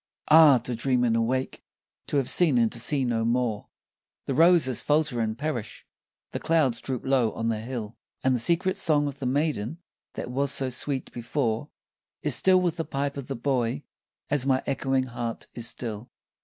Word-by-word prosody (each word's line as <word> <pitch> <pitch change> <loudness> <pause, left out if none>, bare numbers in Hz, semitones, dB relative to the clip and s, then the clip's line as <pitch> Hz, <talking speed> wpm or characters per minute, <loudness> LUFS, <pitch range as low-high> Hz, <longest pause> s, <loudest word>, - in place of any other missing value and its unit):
Ah! 155 -3 +8
to 125 +1 -5
dream 125 +1 +1
and 115 -2 +2
awake 125 +3 -1 0.4
to - - -1
have 135 -3 0
seen 160 -8 +3
and 115 -2 +2
to 120 - -2
see 135 +2 +1
no 115 -2 0
more! 115 -2 -1 0.6
The 135 - -2
roses 160 -5 +4
falter 145 -4 +1
and 110 0 -2
perish, 140 -6 -5 0.5
the - - -4
clouds 150 -8 +1
droop 130 -3 -4
low 130 -4 +2
on 115 0 -2
the 110 -1 -1
hill, 115 -2 -6 0.3
And 130 -1 +3
the - - -1
secret 175 - +1
song 150 -3 +2
of 140 -1 -6
the 130 - -2
maiden 145 -1 -1 0.4
that - - -5
was 140 +2 +1
so 135 -2 +2
sweet 130 +1 -3
before 120 +1 -2 0.5
Is - - +1
still 185 -1 +4
with 175 -2 -1
the 165 - -1
pipe 140 -1 -3
of 140 -2 -7
the 135 - -4
boy, 120 - -1 0.4
as 145 -2 +1
my 130 -1 +2
echoing 135 -1 0
heart 120 -2 -5
is 120 -1 -3
still. 115 -1 -6
130 Hz, 185 wpm, -26 LUFS, 115-145 Hz, 0.6 s, Ah